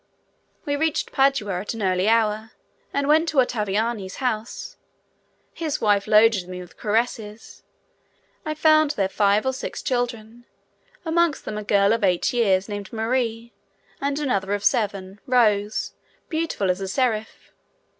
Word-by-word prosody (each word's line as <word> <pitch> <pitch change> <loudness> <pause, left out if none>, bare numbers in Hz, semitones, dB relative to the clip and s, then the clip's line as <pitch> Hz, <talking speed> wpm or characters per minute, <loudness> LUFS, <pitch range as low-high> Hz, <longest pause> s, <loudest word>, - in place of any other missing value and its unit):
We 285 -1 0
reached 315 +1 -1
Padua 270 -9 +1
at 210 - -5
an 220 - -4
early 185 +2 +2
hour 220 -1 +1 0.4
and 280 0 -1
went 320 +2 +4
to 305 - -5
Ottaviani's 215 -4 0
house; 250 - -3 0.8
his 315 -4 -3
wife 205 -2 +2
loaded 215 -3 +4
me 180 0 -6
with 180 -1 -11
caresses. 220 0 -3 0.8
I 310 -2 -3
found 310 -1 +4
there 195 -2 +2
five 200 +2 +2
or 265 - +1
six 260 - -6
children, 240 -2 -3 0.6
amongst 330 -1 +1
them 210 -1 -4
a - - -6
girl 200 0 +3
of 230 -2 -1
eight 180 +2 +2
years, 200 -5 +2
named 205 -2 -6
Marie, 230 0 -2 0.5
and 280 0 -1
another 205 -9 0
of 205 - -6
seven, 200 -2 0
Rose, 215 -4 +2 0.4
beautiful 315 - 0
as 180 +2 -4
a 195 - -3
seraph. 220 0 -2
220 Hz, 145 wpm, -23 LUFS, 205-265 Hz, 0.8 s, went